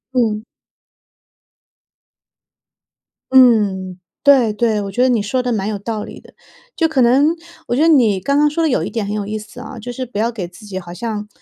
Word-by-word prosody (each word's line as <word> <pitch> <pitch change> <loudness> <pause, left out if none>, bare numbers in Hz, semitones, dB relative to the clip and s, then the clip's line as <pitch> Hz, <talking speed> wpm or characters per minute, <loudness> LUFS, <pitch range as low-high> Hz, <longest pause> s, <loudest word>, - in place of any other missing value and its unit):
嗯。 220 -4 +1 2.9
嗯， 205 -8 +4 0.2
对 260 -7 +5
对， 215 -1 0
我 195 - -5
觉 245 - -1
得 255 - +4
你 230 -4 +2
说 250 +5 -1
的 250 0 -2
蛮 205 -3 -1
有 215 -1 -2
道 215 +1 -4
理 - - -10
的。 - - -19 0.4
就 325 - +2
可 305 -5 +1
能 275 +7 +4 0.3
我 - - 0
觉 280 - +1
得 325 - +4
你 230 - +4
刚 280 +9 0
刚 295 0 +4
说 330 +3 -1
的 320 - +2
有 255 - 0
一 - - -3
点 225 -3 -3
很 205 - -4
有 210 -1 -3
意 215 +1 -4
思 215 +3 -12
啊， 245 +1 -9
就 245 +3 -6
是 255 +1 -5
不 240 -4 -8
要 230 +2 +1
给 195 -7 -5
自 210 +4 -15
己 190 -2 -5
好 175 -1 -10
像 210 +1 -5
230 Hz, 225 characters per minute, -18 LUFS, 210-255 Hz, 2.9 s, 对